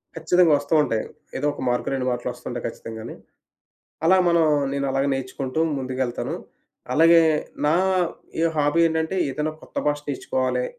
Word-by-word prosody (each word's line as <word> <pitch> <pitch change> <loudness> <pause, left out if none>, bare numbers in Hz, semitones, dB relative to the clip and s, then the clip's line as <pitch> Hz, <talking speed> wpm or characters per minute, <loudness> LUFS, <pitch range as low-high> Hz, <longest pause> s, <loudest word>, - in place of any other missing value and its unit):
ఖచ్చితంగా 165 0 +3
ఒస్తూ 145 - -4
ఉంటాయి. 110 -5 -1 0.3
ఏదో 145 - -2
ఒక - - -9
మార్క్ 120 0 -1
2 130 -2 -1
మార్క్‌లు 120 -1 -2
ఒస్తుంటాయి - - -6
ఖచ్చితంగానే. 110 0 -8 0.9
అలా 185 +3 +6
మనం 170 -1 +4 0.3
నేను 140 0 -1
అలాగ 135 +1 +1
నేర్చుకుంటూ 135 +2 -4 0.2
ముందుకెళ్తాను. 130 -2 -3 0.6
అలాగే 165 +1 +6 0.4
నా 150 +2 +3 0.7
ఏ - - +3
హాబీ 145 +2 +2
ఏంటంటే 160 +3 -1
ఏదైనా 150 +3 -2
కొత్త - - -17
భాష 145 0 +1
నర్చుకోవాలే. 130 -2 -1
140 Hz, 140 wpm, -23 LUFS, 130-160 Hz, 0.9 s, అలా